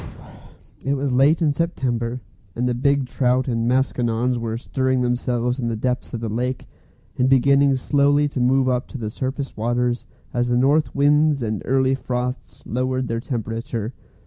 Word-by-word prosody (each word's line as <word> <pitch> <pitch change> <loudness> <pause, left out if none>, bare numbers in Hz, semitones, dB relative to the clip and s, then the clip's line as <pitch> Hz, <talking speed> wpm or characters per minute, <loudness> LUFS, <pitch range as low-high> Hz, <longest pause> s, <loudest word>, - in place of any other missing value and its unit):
It 140 +1 0
was 140 0 -1
late 140 +6 +4
in 150 -2 +3
September, 125 -7 -2 0.3
and 125 +2 0
the 125 - +1
big 140 +2 +1
trout 125 0 +1
and 115 -2 0
maskinonge 125 -1 +1
were 115 -1 -3
stirring 130 +1 0
themselves 125 0 0
in 120 - -1
the 115 - -1
depths 125 +3 -2
of 115 - -5
the 115 - -2
lake, 125 +4 -2 0.5
and 125 +1 +3
beginning 140 +1 +4
slowly 145 +2 +2
to 140 - -4
move 130 +1 +3
up 125 -1 0
to - - -8
the 110 -3 -4
surface 135 +3 -4
waters 120 +2 -1 0.3
as 120 0 +1
the 120 0 +1
north 140 +3 +2
winds 145 -1 +3
and 110 -2 -2
early 130 0 +2
frosts 125 -1 -4
lowered 130 +1 -1
their 115 0 -1
temperature. 115 0 -4
125 Hz, 170 wpm, -22 LUFS, 120-135 Hz, 0.5 s, late